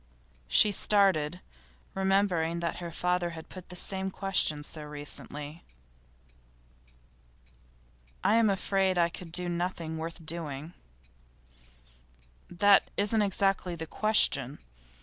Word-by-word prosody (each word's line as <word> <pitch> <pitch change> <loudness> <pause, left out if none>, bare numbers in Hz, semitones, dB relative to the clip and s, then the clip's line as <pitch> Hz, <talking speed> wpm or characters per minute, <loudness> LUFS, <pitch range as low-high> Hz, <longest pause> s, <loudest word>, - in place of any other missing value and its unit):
She 205 - +6
started, 185 -5 +3 0.5
remembering 190 -4 +1
that 170 0 -3
her 175 -1 -6
father 180 +1 0
had 160 - -10
put 185 -2 -11
the 180 - -9
same 190 +1 0
question 185 -6 0
so 155 +1 -1
recently. 150 +1 -6 2.6
'I'm 225 0 +4
afraid 195 -1 0
I 170 -1 +3
could 170 0 -10
do 180 +1 -1
nothing 170 -2 -3
worth 165 0 -7
doing.' 155 -1 -4 1.8
'That 200 +3 +4
isn't 210 +2 +1
exactly 195 -2 0
the 160 -1 -6
question. 150 - +1
175 Hz, 105 wpm, -29 LUFS, 160-195 Hz, 2.6 s, She